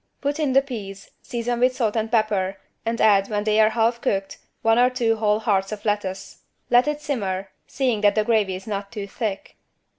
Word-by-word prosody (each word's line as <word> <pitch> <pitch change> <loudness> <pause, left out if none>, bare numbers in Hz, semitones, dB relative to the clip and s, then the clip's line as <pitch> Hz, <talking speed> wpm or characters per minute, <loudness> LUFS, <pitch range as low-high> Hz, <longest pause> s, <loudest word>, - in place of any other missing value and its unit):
Put 285 +2 -2
in 290 -4 +1
the 270 +1 +5
peas, 200 -7 -8
season 240 0 -3
with 255 +1 +3
salt 225 -4 0
and 220 0 -1
pepper 205 -4 +1 0.3
and 230 0 -1
add, 200 -2 +4
when 205 -1 -1
they 215 0 +2
are 215 0 +6
half 230 +1 +1
cooked, 195 0 -2 0.2
one 225 +1 +4
or 250 +1 +5
two 230 -3 0
whole 210 -1 +2
hearts 195 -3 +1
of 215 0 -7
lettuce. 205 -3 -3 0.3
Let 245 +3 +5
it 300 0 -2
simmer, 195 -9 -3 0.2
seeing 250 -6 0
that 205 -1 +4
the 215 - +2
gravy 210 -4 +1
is 185 - -9
not 200 -2 -4
too 210 -4 -5
thick. 200 0 -5
215 Hz, 205 wpm, -23 LUFS, 200-240 Hz, 0.3 s, are